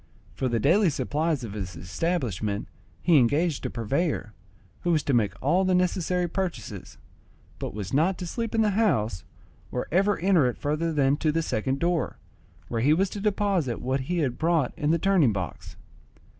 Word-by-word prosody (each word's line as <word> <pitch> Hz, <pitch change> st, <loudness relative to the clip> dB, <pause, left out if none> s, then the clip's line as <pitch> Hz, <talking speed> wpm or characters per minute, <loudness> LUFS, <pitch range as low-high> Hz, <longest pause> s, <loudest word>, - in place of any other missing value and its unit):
For 130 Hz, -, -1 dB
the 120 Hz, -2 st, 0 dB
daily 175 Hz, -, +4 dB
supplies 150 Hz, -1 st, -1 dB
of 110 Hz, -4 st, -6 dB
his 95 Hz, -4 st, -5 dB
establishment 105 Hz, -, -2 dB, 0.4 s
he 165 Hz, -5 st, +6 dB
engaged 145 Hz, +5 st, +1 dB
a -, -, -5 dB
purveyor, 125 Hz, 0 st, -1 dB, 0.5 s
who 175 Hz, -, 0 dB
was 155 Hz, -3 st, +2 dB
to 140 Hz, -, 0 dB
make 110 Hz, -4 st, +1 dB
all 175 Hz, +8 st, +3 dB
the 185 Hz, -1 st, +2 dB
necessary 180 Hz, 0 st, +1 dB
purchases, 150 Hz, -, -5 dB, 0.6 s
but -, -, -5 dB
was 100 Hz, -3 st, -5 dB
not 170 Hz, +6 st, +2 dB
to 180 Hz, -, -5 dB
sleep 230 Hz, +6 st, -3 dB
in 225 Hz, -, +3 dB
the 210 Hz, -, +2 dB
house 120 Hz, -, +1 dB, 0.5 s
or 125 Hz, -, -3 dB
ever 195 Hz, +5 st, +3 dB
enter 175 Hz, -7 st, +3 dB
it 125 Hz, -, -2 dB
further 155 Hz, +3 st, -1 dB
than 140 Hz, -2 st, +2 dB
to 155 Hz, -1 st, +1 dB
the 165 Hz, +2 st, 0 dB
second 130 Hz, +1 st, -1 dB
door, 170 Hz, +1 st, 0 dB, 0.5 s
where 115 Hz, -1 st, -2 dB
he 145 Hz, +5 st, +4 dB
was 190 Hz, +3 st, +1 dB
to 205 Hz, -, -5 dB
deposit 195 Hz, -, 0 dB
what 130 Hz, +2 st, -1 dB
he 175 Hz, +7 st, -2 dB
had 130 Hz, -7 st, -1 dB
brought 160 Hz, -5 st, +1 dB
in 150 Hz, -, -1 dB
the 165 Hz, -, +4 dB
turning 170 Hz, -, +3 dB
box. 90 Hz, -8 st, -5 dB
155 Hz, 185 wpm, -26 LUFS, 120-180 Hz, 0.6 s, he